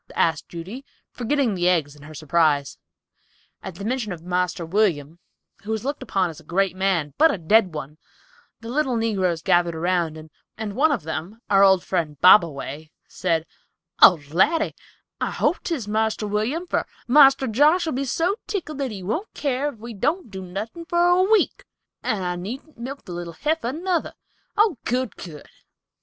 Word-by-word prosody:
asked 160 -2 0
Judy, 190 +10 -8 0.3
forgetting 250 -1 0
the 180 -1 +1
eggs 155 -5 0
in 145 - -17
her 155 +2 -11
surprise. 150 -2 +1 0.8
At 190 -3 -8
the 200 - -7
mention 235 -3 -2
of 170 -2 -7
"Marster 180 0 -1
William," 165 -4 0 0.4
who 205 - -11
was 220 +1 -2
looked 285 +2 -3
upon 185 -3 0
as 160 - -13
a - - -16
great 185 +3 0
man, 185 -6 0
but 320 +1 +6
a - - -2
dead 185 +1 +3
one, 150 +1 -7 0.6
the 230 - -8
little 265 -1 0
negroes 190 -7 0
gathered 175 -3 +2
around, 170 -1 0 0.4
and 215 -2 -5
one 300 +5 +3
of 245 - -1
them, 160 +7 -5
our 195 0 +6
old 190 -2 +5
friend, 160 -6 -2
Bobaway, 155 -4 +4 0.2
said, 165 -3 -1 0.6
"Oh, 180 - +9
Laddy, 315 - +2 0.5
I - - -1
hope - - 0
'tis 285 - -3
Marster 220 0 0
William, 220 - -1
for - - -1 0.2
Marster 270 0 +6
Josh'll 300 +8 +3
be 270 +2 -2
so 345 - 0
tickled 315 -8 -4
that 275 -2 -1
he 200 -4 -7
won't 235 - -3
keer 280 0 -1
if 290 - -5
we 230 +2 -8
don't 285 - -1
do 190 -1 -6
nothin' 210 - -6
for 345 +1 +2
a 355 +1 +4
week; 420 +2 +2 0.4
and 215 -6 -1
I 180 0 -2
needn't 250 - -7
milk 270 +4 -7
the - - -9
little 175 -1 -6
heifer, 300 - -1
nuther! 345 +3 -2 0.4
Oh, 415 - +3
good, 250 0 -1
good!" 155 -5 -10
205 Hz, 175 wpm, -23 LUFS, 170-270 Hz, 0.8 s, Oh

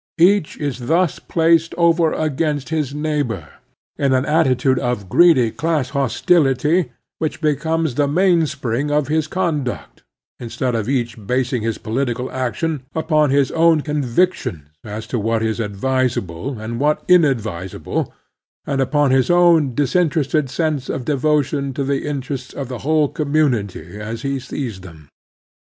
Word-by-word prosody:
Each 180 0 +3
is 140 -4 -3
thus 170 0 +1
placed 165 0 +2
over 170 -1 +3
against 150 -1 -1
his 155 -4 -1
neighbor 145 - -2 0.5
in 140 -2 +2
an 130 +1 +2
attitude 135 -4 +2
of 120 -6 -2
greedy 130 - +5
class 150 -3 -1
hos 135 -2 -2
tility, 150 0 +3 0.3
which 155 -2 -2
becomes 160 0 0
the 145 +3 +1
mainspring 145 -6 +1
of 150 -1 0
his 155 0 +1
con 170 -5 -1
duct, 125 - -6 0.4
instead 125 +1 -3
of 115 0 -2
each 120 -6 -2
basing 125 -1 0
his 115 0 -2
political 125 +2 -2
action 130 +4 -2
upon 155 -2 +2
his 140 -1 +2
own 165 -1 +4
convictions 140 - -1
as 110 +1 -6
to 120 - -3
what 115 +1 0
is 110 +1 -1
advisable, 115 -1 -2
and 115 +2 -5
what 150 +2 +1
inadvisable, 115 - +1 0.5
and 140 -1 -1
upon 145 +1 +2
his 130 -1 +2
own 170 -7 +4
disin 155 +5 +2
terested 150 -2 0
sense 150 -1 -2
of 125 - -3
devotion 145 -1 0
to 140 - -1
the 140 +1 -1
interests 135 -2 -5
of 135 -3 -5
the 125 -2 -5
whole 155 +2 +2
commtmity 120 - -1
as 110 +3 -6
he 140 -1 -1
sees 125 -5 -5
them. 80 -5 -13
140 Hz, 150 wpm, -19 LUFS, 120-155 Hz, 0.5 s, greedy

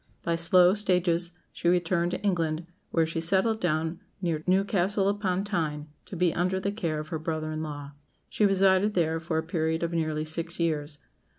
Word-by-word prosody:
By 170 - 0
slow 175 +2 +5
stages 180 -4 +1 0.2
she 170 - 0
returned 175 0 +1
to 180 - -4
England, 165 -4 0 0.2
where 165 -1 +2
she 160 +1 -3
settled 195 +6 +2
down 160 0 -1 0.2
near 165 -5 -2
Newcastle 195 +1 +2
upon 195 -2 0
Tyne, 155 -7 -2 0.2
to - - -7
be 175 -1 +2
under 185 +2 0
the 200 +1 -1
care 170 -7 -2
of 155 0 -6
her 160 - -3
brother 155 0 -3
in 155 0 -3
law. 145 -2 -6 0.4
She - - -1
resided 195 +1 +3
there 165 -2 +1
for 165 -1 -2
a 160 - 0
period 160 0 -1
of 170 - -1
nearly 155 -2 -1
six 165 +2 -2
years. 150 -3 -1
170 Hz, 185 wpm, -27 LUFS, 160-185 Hz, 0.4 s, slow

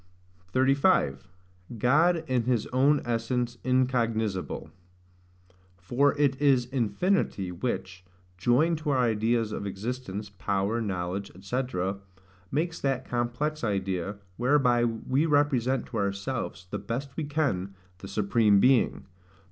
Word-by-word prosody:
35. 130 - +2 0.5
God 160 +9 +3
in 125 -4 +1
his 120 -3 +1
own 140 +3 +3
essence 120 +1 -1
incognisable. 115 -6 0 1.1
For 125 +11 +1
it 140 -2 +1
is 135 -4 +4
infinity, 120 - 0
which, 95 -1 -4 0.3
joined 140 - +2
to 155 -1 -3
our 140 - +2
ideas 115 -1 +1
of 100 - -4
existence, 105 0 -5
power, 100 +3 -1
knowledge, 95 -1 -3
&c., 125 +6 -1 0.9
makes 160 - -2
that 135 -2 -1
complex 125 +6 -2
idea, 95 -2 -1 0.2
whereby 125 -2 +3
we 130 +6 0
represent 135 -4 +2
to 115 - -6
ourselves, 100 -2 -3
the - - -2
best 135 +3 -5
we 160 - -2
can, 130 - -1 0.2
the 95 - -8
Supreme 100 +1 +3
Being. 130 +2 +3
120 Hz, 115 wpm, -27 LUFS, 100-135 Hz, 1.1 s, is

